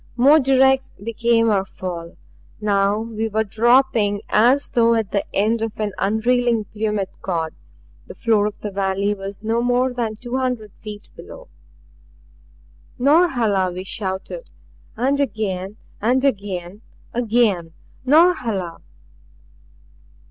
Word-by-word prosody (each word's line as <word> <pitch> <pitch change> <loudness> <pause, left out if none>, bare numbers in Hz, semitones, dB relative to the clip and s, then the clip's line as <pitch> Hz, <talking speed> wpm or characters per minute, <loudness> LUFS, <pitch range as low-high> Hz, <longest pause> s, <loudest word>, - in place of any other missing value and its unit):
More 280 +6 +6
direct 265 -1 +3
became 230 0 +2
our 195 -2 +2
fall. 175 -3 -7 0.4
Now 200 -1 +1
we 225 -1 -3
were 220 +1 0
dropping 225 -2 +2
as 250 +6 +3
though 230 -1 +3
at 220 -4 -1
the 200 - 0
end 220 +3 +1
of 225 -1 -4
an 210 -2 -2
unreeling 230 +2 +1
plummet 210 -2 -2
cord; 165 -4 -2 0.5
the - - -10
floor 215 -3 +2
of 210 - -7
the 210 - -4
valley 195 +1 0
was 195 +1 -8
no 225 +2 0
more 245 +1 +1
than 230 -3 -2
two 245 +3 -4
hundred 250 -6 -2
feet 210 -1 -10
below. - - -12 1.5
"Norhala!" 245 - +3
we 180 +1 -6
shouted; 195 - -5 0.5
and 270 +4 +1
again 210 -6 -2 0.2
and 255 +5 +2
again 200 -5 -2 0.3
again 220 -8 +1 0.3
"Norhala!" 255 - +2
220 Hz, 120 wpm, -21 LUFS, 200-245 Hz, 1.5 s, More